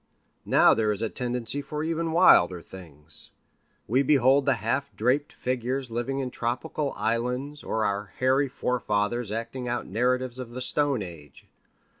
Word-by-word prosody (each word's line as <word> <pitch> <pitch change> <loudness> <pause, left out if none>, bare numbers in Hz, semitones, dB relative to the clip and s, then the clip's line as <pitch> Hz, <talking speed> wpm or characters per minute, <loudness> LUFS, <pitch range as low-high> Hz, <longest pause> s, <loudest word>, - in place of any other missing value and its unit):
Now - - +6
there 110 -1 +1
is 105 +1 -3
a 110 - 0
tendency 125 +1 -2
for 150 +1 -5
even 165 0 -1
wilder 95 - +5
things. 80 -5 -1 0.5
We 125 +6 +3
behold 135 0 +4
the 140 - +4
half 140 +1 -2
draped 130 +6 +1
figures 125 0 -3
living 120 +4 -2
in 130 -2 -3
tropical 130 +5 -3
islands 125 +6 -2
or 110 -1 -1
our 100 0 -2
hairy 130 +2 +2
fore 125 -1 -2
fathers 105 +2 -1
acting 115 +3 -4
out 120 0 -2
narratives 125 +4 0
of 120 -2 -7
the 130 - -4
stone 140 -3 +1
age. 75 -6 -12
125 Hz, 155 wpm, -26 LUFS, 110-135 Hz, 0.5 s, Now